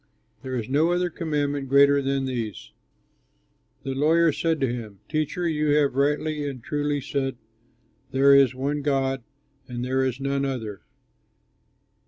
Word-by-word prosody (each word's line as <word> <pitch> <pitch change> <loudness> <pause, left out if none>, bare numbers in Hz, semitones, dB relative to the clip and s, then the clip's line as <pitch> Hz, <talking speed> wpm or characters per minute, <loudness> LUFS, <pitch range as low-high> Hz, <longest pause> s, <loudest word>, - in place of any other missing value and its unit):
There 130 -1 -5
is 115 -3 -3
no 155 +6 +2
other 175 0 0
commandment 145 -4 -2
greater 140 +1 +5
than 135 0 -1
these." 120 -5 -5 1.1
The 135 -1 -3
lawyer 160 +4 +3
said 160 +2 0
to 130 -3 +1
him, 110 -5 -7
"Teacher, 155 +3 -1
you 150 -2 +1
have 145 -3 +3
rightly 150 +2 0
and 130 -4 -9
truly 145 0 -1
said, 135 -1 -2 0.7
'There 140 +2 +5
is 135 -2 +5
one 140 +3 -2
God 135 -2 0 0.5
and 125 0 -4
there 130 +1 +1
is 130 -1 -1
none 140 0 -1
other. 115 -7 -4
140 Hz, 145 wpm, -25 LUFS, 130-150 Hz, 1.1 s, greater